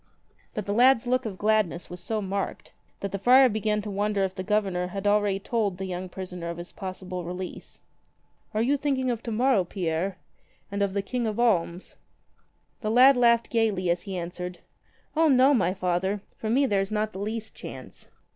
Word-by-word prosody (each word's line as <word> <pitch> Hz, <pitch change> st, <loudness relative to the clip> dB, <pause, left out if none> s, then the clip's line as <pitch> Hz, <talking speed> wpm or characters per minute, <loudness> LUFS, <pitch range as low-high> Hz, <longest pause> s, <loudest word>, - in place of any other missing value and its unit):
But 210 Hz, -, -3 dB
the 205 Hz, -, -1 dB
lad's 250 Hz, +1 st, +5 dB
look 255 Hz, 0 st, +1 dB
of 195 Hz, -3 st, -6 dB
gladness 210 Hz, -5 st, +1 dB
was 180 Hz, -, -8 dB
so 215 Hz, +4 st, -3 dB
marked 195 Hz, 0 st, -4 dB, 0.3 s
that 200 Hz, -, -3 dB
the 200 Hz, -, -3 dB
friar 255 Hz, +5 st, +7 dB
began 210 Hz, -1 st, -1 dB
to 210 Hz, -, -5 dB
wonder 205 Hz, 0 st, 0 dB
if 190 Hz, -1 st, -1 dB
the 185 Hz, -, -5 dB
Governor 190 Hz, -3 st, 0 dB
had 195 Hz, +2 st, -6 dB
already 205 Hz, -1 st, +3 dB
told 200 Hz, -2 st, -1 dB
the 190 Hz, -, -4 dB
young 185 Hz, 0 st, -5 dB
prisoner 180 Hz, -2 st, -6 dB
of 170 Hz, -, -5 dB
his 175 Hz, +1 st, -7 dB
possible 185 Hz, -1 st, -6 dB
release. 180 Hz, +1 st, -7 dB, 0.7 s
"Are 220 Hz, -, +2 dB
you 280 Hz, +4 st, +2 dB
thinking 265 Hz, -3 st, 0 dB
of 230 Hz, -2 st, -3 dB
to 235 Hz, -, -5 dB
morrow, 240 Hz, -2 st, +3 dB
Pierre? 175 Hz, 0 st, -2 dB, 0.5 s
and 200 Hz, 0 st, -2 dB
of 200 Hz, -1 st, 0 dB
the 200 Hz, -, 0 dB
King 240 Hz, +3 st, -2 dB
of 215 Hz, +1 st, -3 dB
Alms?" 185 Hz, -6 st, 0 dB, 0.8 s
The 215 Hz, -, -2 dB
lad 255 Hz, +4 st, +7 dB
laughed 235 Hz, -1 st, +3 dB
gaily 210 Hz, -6 st, +1 dB
as 175 Hz, -, 0 dB
he 195 Hz, -3 st, -5 dB
answered: 180 Hz, +1 st, -5 dB, 0.6 s
"O 325 Hz, +1 st, +4 dB
no, 265 Hz, 0 st, +5 dB
my 185 Hz, -9 st, +2 dB
Father. 190 Hz, +1 st, -1 dB
For 220 Hz, -, -4 dB
me 270 Hz, +5 st, +3 dB
there 200 Hz, -6 st, +2 dB
is 195 Hz, -, -3 dB
not 215 Hz, 0 st, 0 dB
the 190 Hz, -, -8 dB
least 220 Hz, +2 st, -4 dB
chance. -, -, -10 dB
205 Hz, 195 wpm, -26 LUFS, 185-230 Hz, 0.8 s, friar